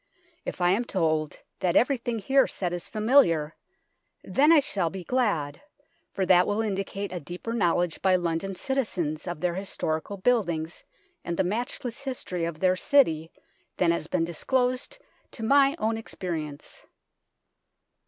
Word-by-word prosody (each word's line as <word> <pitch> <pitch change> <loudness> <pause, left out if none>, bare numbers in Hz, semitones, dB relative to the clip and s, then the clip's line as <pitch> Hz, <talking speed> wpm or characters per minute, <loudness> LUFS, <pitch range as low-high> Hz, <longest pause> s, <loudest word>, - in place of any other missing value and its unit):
If - - -5
I 175 0 +4
am 210 +6 +2
told 155 -8 -1 0.2
that 180 -2 0
everything 240 -2 +2
here 265 +6 +3
said 180 -2 -3
is 175 - -5
familiar, 210 - +3 0.7
then 295 +4 +3
I 330 - +8
shall 195 - -1
be 190 +1 -7
glad, 170 - 0 0.5
for 190 - -1
that 180 0 +5
will 205 +1 0
indicate 200 -2 -2
a 180 - -4
deeper 175 +8 -6
knowledge 175 -5 +1
by 190 -1 +4
London 175 +2 -1
citizens 185 - -2
of 175 -3 -4
their 180 -1 +1
historical 190 -1 -3
buildings 175 -7 0 0.4
and 170 0 -3
the 190 - +3
matchless 235 +5 -3
history 235 -11 -3
of 165 -2 -5
their 185 0 +4
city 165 - +2 0.5
than 175 -2 +3
has 170 - -2
been 170 -2 0
disclosed 250 - -1 0.4
to 225 - -7
my 275 +4 +4
own 225 -5 0
experience. 160 -9 -6
185 Hz, 145 wpm, -27 LUFS, 170-235 Hz, 0.7 s, I